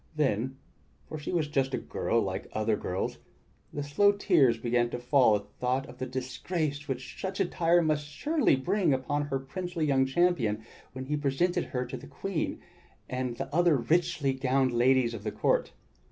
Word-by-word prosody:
Then— 130 -3 0 0.5
for 155 - -6
she 150 - -5
was 165 -4 +1
just 135 -2 0
a - - -1
girl 115 - -1
like 95 -3 -3
other 110 0 +1
girls 90 -2 -3 0.3
— - - -36
the 145 - -4
slow 200 +9 +4
tears 165 - +3
began 120 +1 +1
to 120 - -4
fall 125 -2 +4
at 100 - -2
the 105 - -26
thought 130 +2 0
of 125 - -13
the 130 - -3
disgrace 145 +4 -3
which 130 -1 -5
such 190 +1 -3
attire 175 -2 +3
must 150 -2 0
surely 290 - +2
bring 175 +2 +1
upon 145 +3 -1
her 135 -2 -1
princely 165 +5 -4
young 135 -2 +3
champion 135 -9 +1 0.3
when 130 +1 -6
he 150 +3 -1
presented 145 +5 0
her 125 -1 -3
to - - -6
the - - -11
Queen 195 -5 -3 0.5
and 125 -2 -3
the 145 - -5
other 175 -3 +4
richly 140 +1 +1
gowned 130 0 +1
ladies 120 0 +3
of 105 -3 -7
the 105 - -2
court. 105 - +1
135 Hz, 185 wpm, -29 LUFS, 125-155 Hz, 0.5 s, slow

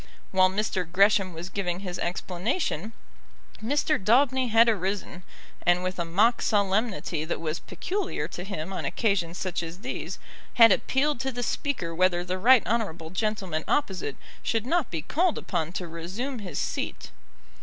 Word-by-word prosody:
While 185 -1 +5
Mr. 190 -3 -2
Gresham 195 0 +4
was 170 +1 -7
giving 180 -2 -2
his 180 -3 -5
explanation, 190 - -2 0.7
Mr. 290 0 +1
Daubeny 260 +4 +4
had 230 +1 +5
arisen, 195 -3 -1 0.4
and 175 +1 +3
with 185 0 -3
a 170 - 0
mock 210 +8 +3
solemnity 195 -6 0
that 160 - -3
was 160 +1 -3
peculiar 370 - -3
to 175 - -6
him 190 -2 -5
on - - -3
occasions 190 -6 0
such 185 -2 -2
as 170 +3 -7
these, 255 +3 -4 0.4
had 230 -1 +8
appealed 285 0 +1
to 265 +1 -1
the 245 -1 -4
Speaker 235 - -2
whether 175 0 +2
the 185 +1 -3
right 250 +3 +6
honourable 175 -8 -2
gentleman 190 -5 -1
opposite 185 - 0 0.3
should 225 -1 0
not 330 +3 +1
be 160 -3 -4
called 335 - +1
upon 170 -3 -2
to 185 -3 -4
resume 190 +11 -5
his 180 -8 -6
seat. - - -3
190 Hz, 155 wpm, -27 LUFS, 175-235 Hz, 0.7 s, had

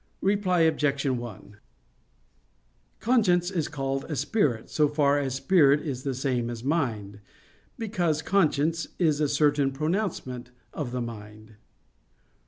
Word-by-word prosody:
Reply 190 -3 +2
Obj. 150 -3 +1
1: 120 -6 -4 1.4
Conscience 190 -7 +2
is 170 -5 -1
called 135 -2 -3
a 155 - -4
spirit, 145 - 0
so 150 -1 +3
far 145 -1 +2
as 135 -2 -2
spirit 145 -1 +4
is 135 -5 -4
the 135 -1 -3
same 125 -3 -1
as 120 -1 -6
mind; 115 -9 -1 0.6
because 175 -9 -1
conscience 165 -4 +1
is 155 -4 +2
a 150 - +3
certain 145 -1 +2
pronouncement 150 - -3 0.2
of 140 -6 -4
the 125 0 -2
mind. 110 -1 -9
145 Hz, 125 wpm, -26 LUFS, 125-165 Hz, 1.4 s, spirit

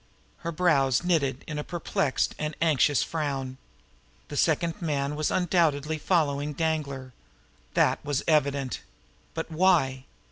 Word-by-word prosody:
Her 170 - -4
brows 150 -5 +2
knitted 145 -7 +1
in 150 -1 -4
a - - -3
perplexed 160 -5 -1
and 150 0 -3
anxious 150 -3 +3
frown. 135 -5 -3 0.7
The - - -6
second 170 +3 +1
man 145 -3 -1
was 155 0 0
undoubtedly 160 -4 +1
following 150 -4 +1
Danglar. 140 -5 -2 0.6
That - - +3
was 145 -2 -1
evident. 140 -4 +1 0.5
But 165 0 -4
why? 155 -7 +2
150 Hz, 120 wpm, -27 LUFS, 140-165 Hz, 0.7 s, anxious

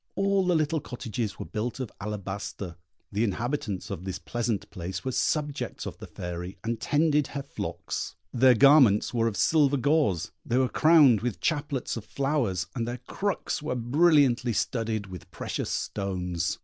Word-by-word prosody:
All 195 -1 +2
the 180 - +3
little 155 0 +1
cottages 115 -4 -4
were - - -6
built 115 +4 -3
of 130 -4 -4
alabaster. 100 -3 -5 0.4
The 105 +3 0
inhabitants 115 -1 -2
of 85 - -5
this 95 -2 -4
pleasant 120 -2 -2
place 95 +1 -5
were 130 - 0
subjects 145 +2 -1
of - - -7
the - - -8
Fairy, 90 +1 -6
and 115 0 -2
tended 150 -1 +2
her 140 -1 -5
flocks; 140 - -5 0.2
their 125 0 +6
garments 130 -5 +6
were 115 -1 +2
of 105 -3 -2
silver 145 -3 +4
gauze; 140 - +1
they 120 - 0
were 130 -1 +3
crowned 155 -9 +6
with 115 -7 -2
chaplets 145 -6 -1
of 115 - -6
flowers; 135 -10 0
and 115 -1 -2
their 120 +1 -3
crooks 200 -5 -2
were 150 -4 -2
brilliantly 130 -1 +3
studded 110 -2 -1
with 95 -2 -10
precious - - -4
stones. 90 -4 -2
120 Hz, 160 wpm, -27 LUFS, 100-145 Hz, 0.4 s, their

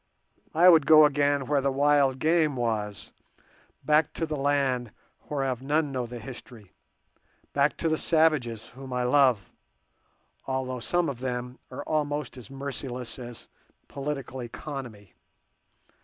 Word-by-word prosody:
I 175 +3 +6
would 165 -5 +7
go 155 -1 +9
again 145 -1 +1
where 145 +1 +1
the 140 0 +1
wild 140 -1 +3
game 155 0 +2
was, 110 -5 -3 0.7
back 150 0 +3
to 165 - -2
the 155 -1 -4
land 135 -4 0 0.4
whereof 135 -4 -2
none 145 +2 0
know 125 -2 -3
the 120 +1 -7
history, 120 -4 -11 0.8
back 145 +1 +2
to 165 - -1
the 155 -1 +1
savages, 145 -9 +1
whom 130 0 -9
I 125 0 0
love, 125 -4 +3 1.0
although 130 -1 -2
some 165 +10 0
of 130 -4 -4
them 125 0 -4
are - - -7
almost 150 -3 -2
as 125 -5 -11
merciless 135 -3 -6
as 120 -2 -9 0.4
Political 135 -2 -5
Economy. 120 - -8
135 Hz, 135 wpm, -27 LUFS, 125-145 Hz, 1.0 s, go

